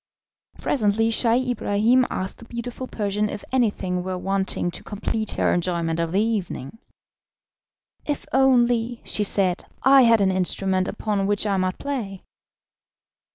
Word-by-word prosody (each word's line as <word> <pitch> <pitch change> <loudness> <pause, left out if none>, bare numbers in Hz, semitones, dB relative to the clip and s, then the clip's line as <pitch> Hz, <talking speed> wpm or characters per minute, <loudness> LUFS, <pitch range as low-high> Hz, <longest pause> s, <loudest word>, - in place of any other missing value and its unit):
Presently 225 -2 +1
Scheih 245 +2 +2
Ibrahim 235 +3 +2
asked 185 0 -4
the 230 - -12
beautiful 240 +2 -6
Persian 210 -1 -1
if 205 - -6
anything 205 -8 0
were 185 0 -4
wanting 190 -1 -1
to - - -7
complete 215 +1 -3
her - - +1
enjoyment 170 -2 -1
of 165 -1 -1
the 190 - +2
evening. 215 - -3 1.3
"If 290 -1 -2
only," 245 -3 +3
she 210 - 0
said, 190 -3 +1 0.2
"I 270 +1 +7
had 230 -2 +5
an 195 -1 +3
instrument 185 0 0
upon 205 -2 -1
which 205 +1 0
I 200 -2 +1
might 185 0 -1
play." 225 -10 -4
210 Hz, 140 wpm, -23 LUFS, 190-235 Hz, 1.3 s, I